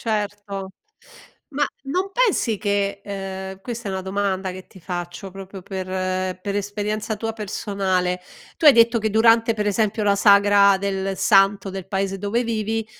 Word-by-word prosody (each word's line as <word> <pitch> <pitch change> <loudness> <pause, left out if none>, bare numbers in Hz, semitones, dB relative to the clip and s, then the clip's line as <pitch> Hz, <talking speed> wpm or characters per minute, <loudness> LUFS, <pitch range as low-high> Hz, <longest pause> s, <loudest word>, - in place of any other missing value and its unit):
Certo, 205 -3 -3 0.8
ma 290 0 0 0.2
non 365 +8 -1
pensi 385 - +1
che 200 -1 -1
ehm, 190 -1 -6
questa 235 -2 -5
è - - -2
una 190 0 -3
domanda 190 0 -1
che 185 +1 -9
ti 190 - -16
faccio, 175 +2 -6
proprio 195 0 -10
per 190 0 -5 0.5
per 200 +1 -4
esperienza 210 +2 -3
tua 225 +2 -3
personale, 190 -4 -2 0.4
tu 320 - +2
hai 295 - +11
detto 230 0 +5
che 220 0 0
durante 225 +1 +4
per 210 -1 -2
esempio 215 +1 0
durante 200 -1 +2
la - - +10
sagra 200 -1 +5
del 195 0 -2
santo 195 0 +3
del 190 -1 -6
paese 195 0 -2
dove 205 +5 0
vivi, 225 -1 -2
200 Hz, 160 wpm, -22 LUFS, 195-220 Hz, 0.8 s, hai